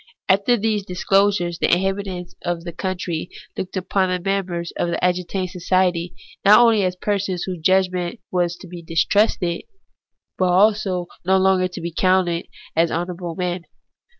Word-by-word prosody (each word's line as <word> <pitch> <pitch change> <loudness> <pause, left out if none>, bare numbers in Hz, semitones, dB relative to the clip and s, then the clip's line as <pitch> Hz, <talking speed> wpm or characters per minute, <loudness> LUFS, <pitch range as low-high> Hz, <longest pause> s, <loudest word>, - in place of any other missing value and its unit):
After 200 +6 +3
these 215 -1 0
disclosures 190 -1 +1
the - - +2
inhabitants 190 -1 -1
of 175 -1 -3
that 170 -1 -8
country 175 -3 -3 0.3
looked 190 +1 -4
upon 185 0 0
the 180 - +1
members 180 -3 -2
of - - -1
the - - -3
agitating 180 +1 -1
society, 180 -1 0 0.3
not 210 +3 +8
only 230 -4 +5
as 180 -1 0
persons 195 -2 -1
whose 185 -2 -4
judgment 185 +3 +1
was 175 -1 0
to 185 - -12
be 175 0 -9
distrusted, 170 +2 +1 0.8
but 185 - +3
also 195 -1 +3
as - - -15 0.2
no 190 +1 +4
longer 190 -1 +3
to 180 - -8
be 170 0 -5
counted 185 -2 +2 0.3
honour 170 +2 +1
able 175 -1 -6
men. 180 -1 -3
185 Hz, 155 wpm, -21 LUFS, 175-195 Hz, 0.8 s, not